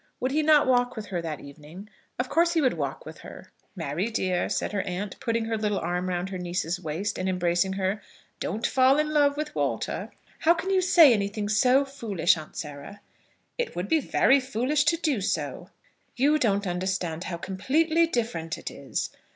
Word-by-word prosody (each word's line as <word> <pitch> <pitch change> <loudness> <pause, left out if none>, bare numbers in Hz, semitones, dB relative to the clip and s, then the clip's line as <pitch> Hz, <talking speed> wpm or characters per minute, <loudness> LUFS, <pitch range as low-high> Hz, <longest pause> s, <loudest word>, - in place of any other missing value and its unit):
Would 255 - -1
he 305 +3 +2
not 300 -1 +5
walk 245 -1 +2
with 220 -2 -6
her 185 -4 -3
that 160 -3 -5
evening? 155 +7 -12 0.3
Of 250 - -1
course 335 +4 +2
he 330 - +2
would 260 -3 +3
walk 140 -4 -4
with - - -10
her. - - -12 0.2
"Mary, 170 +10 -2
dear," 185 -5 -1
said - - -1
her 205 -2 0
aunt, 185 +2 -4
putting 230 -3 -1
her 225 -1 -2
little 210 -2 0
arm 180 +2 -2
round 180 +1 -2
her 185 -1 -5
niece's 175 -1 -2
waist, 175 +4 -3
and 185 +1 -1
embracing 180 +1 +1
her, 195 +2 -1 0.4
"don't 225 +5 -3
fall 260 +1 +4
in 305 0 +1
love 290 -1 +3
with 305 0 -3
Walter." - - -2 0.3
"How 335 +2 +4
can 360 +4 -3
you 380 -1 +3
say 335 -7 +7
anything 205 0 -2
so 250 +6 +4
foolish, 215 -12 +1
Aunt 155 -2 -10
Sarah?" 150 +6 -7 0.6
"It 485 - -2
would 180 +3 -3
be 320 - +3
very 275 0 +3
foolish 265 +3 0
to 335 +2 +3
do 300 - 0
so." 190 - -3 0.5
"You 290 +4 +3
don't 205 -5 +1
understand 180 -2 -2
how 170 - -4
completely 310 - +1
different 220 - -2
it - - -7
is. - - -4
210 Hz, 190 wpm, -26 LUFS, 180-275 Hz, 0.6 s, say